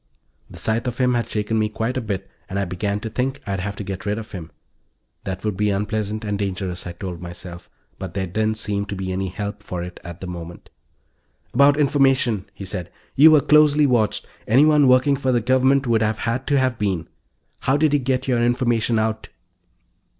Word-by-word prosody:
The - - -12
sight 115 +3 -1
of 120 -1 -3
him 125 -1 +2
had 120 -1 -1
shaken 110 +1 -1
me 110 0 +1
quite 115 +4 -2
a 130 - -1
bit 100 -4 -4 0.2
and 95 - -3
I 100 - 0
began 100 +3 -2
to 110 - -4
think 130 +4 -1
I'd 100 -2 -2
have 100 +2 -4
to 105 - -6
get 95 -1 -5
rid 105 0 -1
of 110 0 -7
him. 85 -6 -7 0.8
That 95 +1 -4
would 105 -3 0
be 105 +2 +1
unpleasant 105 +2 -2
and 105 -1 -2
dangerous, 95 -3 -3
I 85 - -5
told 90 -1 -6
myself. 85 0 -9 0.3
But 95 -2 -6
there 95 -1 -1
didn't 110 +4 -1
seem 100 -1 -2
to 100 - -4
be 95 -1 -4
any 95 +1 -2
help 100 +3 -5
for 90 -1 -5
it, 90 0 -8
at 85 +1 -8
the - - -6
moment. 85 -1 -8 0.8
"About 140 +3 +5
information," 135 -8 +2
he 100 - -7
said. 90 -2 -5 0.2
"You 150 +4 +8
were 155 -2 +6
closely 150 0 +5
watched 120 -5 +1 0.2
anyone 145 +4 +5
working 130 +2 +4
for 130 -1 0
the 120 - +3
Government 130 +3 +3
would 115 -2 +2
have 110 0 +1
had 120 +4 -2
to 145 - +3
have 130 -3 +1
been. 95 -6 -1 0.5
How 135 +2 +2
did 155 -1 +2
you 145 - +4
get 130 0 -1
your 120 -2 +2
information 120 -1 +1
out?" 110 0 -1
110 Hz, 210 wpm, -22 LUFS, 95-130 Hz, 0.8 s, You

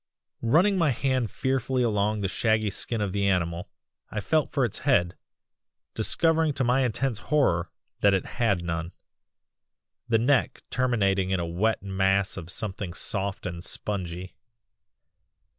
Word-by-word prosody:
"Running 180 - +3
my 165 -3 +3
hand 130 -2 0
fearfully 130 -1 0
along 105 -2 +1
the 100 - 0
shaggy 110 +2 +1
skin 115 +3 -2
of 100 -3 -1
the 100 -1 +1
animal, 85 -2 0 0.4
I 105 - -3
felt 155 +9 +1
for 135 -3 +2
its 110 - -3
head, 95 -11 +2 0.8
discovering 160 +7 +1
to 135 - 0
my 125 +2 +3
intense 125 -1 0
horror 90 - +2 0.3
that 100 -1 +4
it 95 - -1 0.2
had 100 -7 +2
none, 85 +1 -3 1.2
the 115 - +4
neck 130 +4 +1
terminating 100 -7 +1
in 95 -1 +1
a 85 - -1
wet 95 +6 0
mass 95 0 +1
of 85 - -7
something 95 -2 -4
soft 100 +2 -2
and 85 -1 -5
spongy. 90 -3 -4
105 Hz, 140 wpm, -26 LUFS, 95-125 Hz, 1.2 s, that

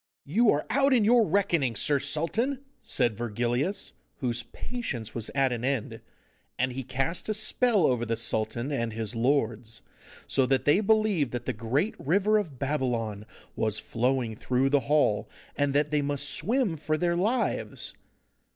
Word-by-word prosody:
'You 210 +10 +3
are 145 - +2
out 275 +3 +3
in 230 -5 +4
your 235 0 +5
reckoning, 165 - +1
Sir 140 +6 +3
Sultan!' 235 - 0 0.2
said 120 -4 0
Virgilius, 120 - -2 0.3
whose 120 -2 -2
patience 125 - -6
was 115 -2 -4
at 135 -2 +2
an 120 -1 -3
end, 130 -4 -2 0.6
and 130 +1 0
he 135 - -4
cast 135 - -2
a 215 - +1
spell 215 -2 +2
over 125 -4 +1
the 115 -1 -1
sultan 115 +3 -1
and 115 -5 -2
his 110 0 -3
lords, 115 -3 0 0.4
so 135 -2 +2
that 135 0 +1
they 145 +6 +5
believed 210 - +2
that 120 - -4
the - - -1
great 125 - -1
river 200 +8 +2
of 160 -10 -6
Babylon 120 -7 -2 0.3
was 110 -1 0
flowing 120 0 -1
through 130 +4 0
the 145 - +4
hall, 145 -9 +2 0.3
and 145 -1 +1
that 150 +1 +2
they 150 -1 +2
must 145 0 0
swim 220 - 0
for 155 0 -1
their 170 +1 +1
lives. 215 +8 -1
140 Hz, 160 wpm, -27 LUFS, 120-185 Hz, 0.6 s, your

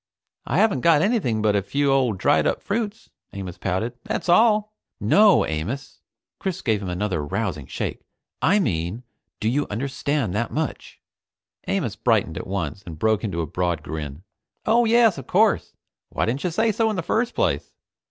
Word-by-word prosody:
"I - - 0
haven't 200 - +3
got 160 -1 +5
anything 190 - +1
but 105 -1 +3
a 100 - +2
few 140 +8 0
old 130 -7 +2
dried - - +3
up - - 0
fruits," 220 +1 -3 0.2
Amos 95 -3 -7
pouted. 95 +6 -1
"That's - - -3
all." 215 +2 +4 0.3
"No, 200 - +5
Amos!" 95 - -4 0.4
Chris 190 -2 -3
gave 110 -4 +1
him 95 - -4
another 90 -3 -1
rousing 75 - -3
shake. - - -4 0.4
"I 205 - +4
mean, 90 - -1 0.4
do 110 - -1
you 140 +6 +1
understand 135 0 -2
that 115 +3 -1
much?" 155 -1 -4 0.7
Amos - - -1
brightened - - +1
at - - -7
once 95 -2 -3
and 85 -5 -9
broke 110 +5 +1
into 95 -6 -2
a - - -1
broad 85 0 -2
grin. 75 +1 -6 0.4
"Oh 235 +2 +4
yes, 225 -6 +4
of - - -10
course. - - +2 0.3
Why - - -1
didn't 125 +5 -2
you 180 - +1
say 220 +7 +1
so 220 +1 +1
in 215 - -1
the 180 - -2
first 240 +7 0
place? - - 0
120 Hz, 175 wpm, -23 LUFS, -, 0.7 s, got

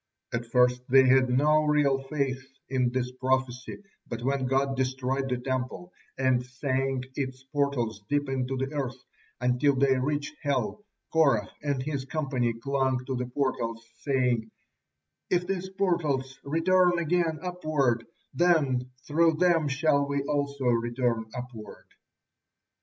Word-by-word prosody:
At 115 0 -2
first 125 +1 +3
they 135 +1 +7
had 130 0 +5
no 150 +5 +4
real 145 -3 +3
faith 135 -2 -2 0.2
in 130 -2 +1
this 125 0 -1
prophecy, 130 +3 -2 0.2
but 120 0 -5
when 135 0 0
God 135 +1 +1
destroyed 130 +1 -1
the 125 - 0
Temple, 130 +7 -4 0.2
and 130 -2 +2
sank 130 +1 -1
its 130 -2 -4
portals 135 -6 -1
deep 145 0 +1
into 135 0 -2
the 135 +3 -3
earth 135 -3 -3 0.4
until 125 +3 +2
they 135 -1 +3
reached 145 +2 -2
hell, 150 +8 -1 0.3
Korah 140 -11 +3
and 140 -3 -1
his 140 -2 -3
company 135 -5 -1
clung 130 +1 -1
to 130 0 -2
the 125 0 -2
portals, 115 -3 -2
saying: 125 -5 0 0.8
"If 180 0 +2
these 190 0 -3
portals 155 -9 -1
return 175 +4 +3
again 170 -1 +1
upward, 155 -10 0 0.3
then 140 -8 +2 0.2
through 165 +2 +3
them 165 -1 +3
shall 140 0 +2
we 140 -1 -1
also 140 -1 -2
return 120 -1 +1
upward." 125 -4 -8
135 Hz, 135 wpm, -28 LUFS, 125-145 Hz, 0.8 s, they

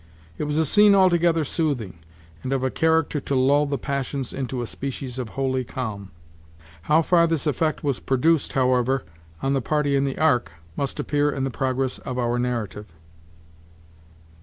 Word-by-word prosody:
It - - -1
was 150 0 -2
a 160 - +3
scene 205 +5 +5
altogether 175 -4 +3
soothing, 135 - -2 0.4
and 130 - -4
of 135 -1 -1
a 130 - 0
character 160 -2 +1
to 140 0 -3
lull 140 +3 +3
the 140 0 -1
passions 140 0 -3
into 130 -2 -3
a - - -3
species 130 0 -5
of 120 -3 -4
holy 130 -1 0
calm. 110 -6 -5 0.8
How 160 +2 +5
far 170 0 +4
this 165 -2 -1
effect 155 +2 0
was 140 -4 0
produced, 150 +4 +1
however, 130 0 +2 0.4
on 135 - +1
the 135 - +1
party 145 +2 0
in 135 - +2
the 135 -1 -2
ark, 125 - +2 0.2
must 140 -1 -3
appear 145 0 +1
in 135 -2 -2
the 135 - -1
progress 130 0 -1
of 125 - -6
our 120 0 0
narrative. 115 -4 -3
135 Hz, 170 wpm, -23 LUFS, 125-150 Hz, 0.8 s, scene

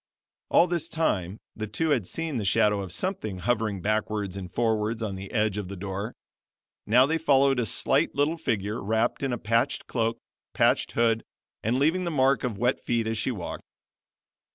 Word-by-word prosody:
All - - +6
this 170 -2 -2
time 100 - -1 0.2
the 110 -1 -4
two 150 +10 -1
had 120 -10 +1
seen 165 -4 -3
the 110 - -2
shadow 105 0 +3
of 95 -3 -6
something 110 - -2
hovering 105 -1 -1
backwards 105 -2 -1
and 95 -2 -7
forwards 110 0 0
on 105 -3 -2
the 95 0 -7
edge 105 -2 +1
of 100 - -5
the 100 - -6
door; 100 +3 -5 0.7
now 125 +5 +6
they 160 +3 0
followed 140 -3 +3
a 115 - 0
slight - - +2
little 145 +4 +1
figure, 110 -7 -2
wrapped 110 +3 0
in 135 -2 -1
a 120 - -1
patched 115 +1 0
cloak, 115 -1 -1 0.4
patched - - +2
hood, 115 -1 +2 0.4
and 115 +4 0
leaving 160 +7 +2
the 175 - -1
mark 135 -3 +2
of 120 -6 -2
wet 120 +5 0
feet 115 -1 0
as 110 -1 -1
she - - 0
walked. 100 -9 -5
115 Hz, 185 wpm, -27 LUFS, 105-135 Hz, 0.7 s, All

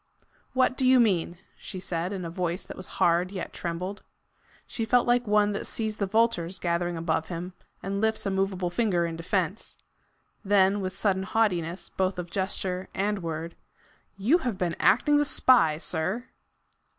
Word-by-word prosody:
"What 255 -1 +3
do 260 - +2
you 260 0 +6
mean?" 180 -6 +2 0.2
she 190 - -6
said, 180 -1 -2
in 190 -3 -4
a - - -4
voice 180 0 -2
that - - -9
was 185 - -7
hard 175 +1 +3
yet 190 -2 -6
trembled. 180 +4 -4 0.6
She 230 - -4
felt 245 +2 +3
like 245 -1 +2
one 210 0 +3
that 200 - -3
sees 220 -1 -3
the 200 - -1
vultures 195 -4 +1
gathering 175 0 -1
above 160 -1 -1
him, 180 +1 -5 0.3
and 200 +1 -2
lifts 220 -1 0
a 195 - 0
moveable 190 -2 -1
finger 180 -4 +1
in 165 -1 -4
defence. 185 +3 -2 0.7
Then 200 0 +3
with 185 0 -4
sudden 195 -2 +1
haughtiness 185 -4 0
both 190 0 -1
of 175 -1 -5
gesture 190 -1 -2
and 205 +1 0
word: 165 0 -5 0.6
"You 245 - +3
have 245 - -2
been 175 -3 -1
acting 290 +8 +4
the 295 - +4
spy, 240 - +4
sir!" 180 +7 -2
190 Hz, 170 wpm, -27 LUFS, 175-210 Hz, 0.7 s, you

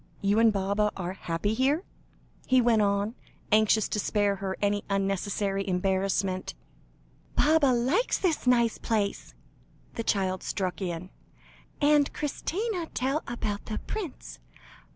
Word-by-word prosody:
You 200 +2 +2
and 225 -1 +6
Baba 200 +1 0
are 180 -1 -3
happy 180 +2 -2
here?" 275 +8 +1 0.6
he 260 0 +5
went 235 -3 +4
on, 200 +1 +1 0.4
anxious 215 0 +4
to 210 - -1
spare 205 -1 +1
her 190 -1 -4
any 205 0 0
unnecessary 195 0 -1
embarrassment. 190 0 0 0.8
"Baba 310 -1 +4
likes 255 - +2
this 330 -8 0
nice 235 -2 +3
place," 210 -3 -2 0.6
the 230 - -3
child 190 -4 0
struck 185 -1 -3
in, 175 0 -4 0.7
"and 290 -1 +4
Christina 355 +5 -2
tell 270 +5 0
about 215 -4 -3
the 215 - -4
prince. 390 -10 -6
210 Hz, 125 wpm, -28 LUFS, 195-255 Hz, 0.8 s, and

